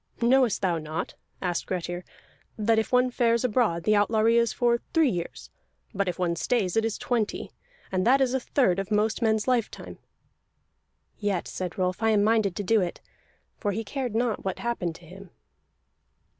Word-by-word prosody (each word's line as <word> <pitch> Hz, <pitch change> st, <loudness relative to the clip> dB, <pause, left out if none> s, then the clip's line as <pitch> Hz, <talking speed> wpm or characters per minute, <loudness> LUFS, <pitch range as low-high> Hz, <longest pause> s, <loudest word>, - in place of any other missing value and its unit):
"Knowest 245 Hz, -3 st, +3 dB
thou 175 Hz, -3 st, +1 dB
not," 155 Hz, +1 st, -5 dB, 0.3 s
asked 175 Hz, -2 st, -2 dB
Grettir, 175 Hz, -1 st, -3 dB, 0.5 s
"that 220 Hz, +1 st, +2 dB
if 220 Hz, -, -3 dB
one 250 Hz, 0 st, +3 dB
fares 235 Hz, -1 st, +2 dB
abroad 215 Hz, -8 st, +1 dB
the 215 Hz, -, +3 dB
outlawry 220 Hz, +2 st, +3 dB
is 235 Hz, -1 st, +3 dB
for 235 Hz, -1 st, +1 dB, 0.2 s
three 320 Hz, -6 st, +4 dB
years, 175 Hz, -3 st, -6 dB, 0.4 s
but 200 Hz, -1 st, -1 dB
if 180 Hz, -, -2 dB
one 175 Hz, -2 st, 0 dB
stays 190 Hz, 0 st, 0 dB
it 225 Hz, -, +3 dB
is 225 Hz, -1 st, -1 dB
twenty? 230 Hz, -4 st, -2 dB, 0.4 s
And 185 Hz, -1 st, 0 dB
that 265 Hz, +3 st, +5 dB
is 260 Hz, -2 st, +2 dB
a 265 Hz, -, +1 dB
third 245 Hz, -8 st, +1 dB
of 195 Hz, -, -4 dB
most 215 Hz, +2 st, +1 dB
men's 220 Hz, -1 st, +1 dB
lifetime." 245 Hz, -4 st, -2 dB, 1.2 s
"Yet," 205 Hz, -4 st, -1 dB
said 180 Hz, -2 st, -5 dB
Rolf, 185 Hz, +1 st, -1 dB
"I 225 Hz, -, +3 dB
am 210 Hz, -2 st, +3 dB
minded 215 Hz, -4 st, +2 dB
to 205 Hz, -, -3 dB
do 220 Hz, +2 st, +3 dB
it." 175 Hz, -2 st, -3 dB, 0.6 s
For 205 Hz, -2 st, -1 dB
he 225 Hz, +3 st, -3 dB
cared 245 Hz, +1 st, -4 dB
not 235 Hz, -2 st, 0 dB
what 190 Hz, -1 st, -3 dB
happened 210 Hz, -9 st, -2 dB
to 175 Hz, -, -14 dB
him. 185 Hz, +3 st, -12 dB
215 Hz, 180 wpm, -26 LUFS, 185-235 Hz, 1.2 s, that